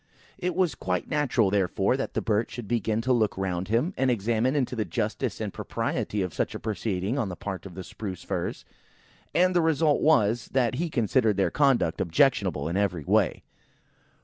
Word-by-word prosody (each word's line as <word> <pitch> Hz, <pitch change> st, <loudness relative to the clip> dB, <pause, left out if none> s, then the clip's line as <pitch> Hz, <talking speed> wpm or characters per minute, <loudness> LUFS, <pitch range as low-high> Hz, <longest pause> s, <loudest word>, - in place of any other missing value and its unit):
It 180 Hz, 0 st, -2 dB
was 180 Hz, -6 st, +2 dB
quite 90 Hz, -6 st, -2 dB
natural, 125 Hz, -9 st, +2 dB
therefore, 100 Hz, +3 st, +1 dB
that 135 Hz, -, -4 dB
the -, -, 0 dB
poor 110 Hz, -4 st, +2 dB
Birch 115 Hz, -, -1 dB
should 120 Hz, -3 st, -6 dB
begin 115 Hz, -1 st, 0 dB
to 130 Hz, +2 st, +2 dB
look 110 Hz, -5 st, +1 dB
round 95 Hz, -1 st, -2 dB
him, 125 Hz, -, +1 dB
and 130 Hz, 0 st, +1 dB
examine 120 Hz, +3 st, +1 dB
into 130 Hz, -3 st, 0 dB
the 110 Hz, -, 0 dB
justice 90 Hz, -, -2 dB
and -, -, -4 dB
propriety 105 Hz, -2 st, -2 dB
of 90 Hz, -, -4 dB
such -, -, -2 dB
a -, -, -4 dB
proceeding 110 Hz, +2 st, -2 dB
on 110 Hz, -7 st, -1 dB
the 90 Hz, -, -5 dB
part 95 Hz, +1 st, -6 dB
of 90 Hz, -, -12 dB
the 95 Hz, -, -6 dB
Spruce 95 Hz, -2 st, -7 dB
firs; -, -, -3 dB, 0.7 s
and 185 Hz, +1 st, +3 dB
the 175 Hz, -, +5 dB
result 160 Hz, -2 st, +2 dB
was, 120 Hz, -7 st, +3 dB
that 130 Hz, -2 st, +2 dB
he 175 Hz, -, -1 dB
considered 115 Hz, -4 st, +2 dB
their 95 Hz, -, +2 dB
conduct 135 Hz, -, +2 dB
objectionable 90 Hz, -, +2 dB
in 85 Hz, +3 st, -1 dB
every 90 Hz, -6 st, 0 dB
way. -, -, +1 dB
110 Hz, 195 wpm, -27 LUFS, 95-130 Hz, 0.7 s, the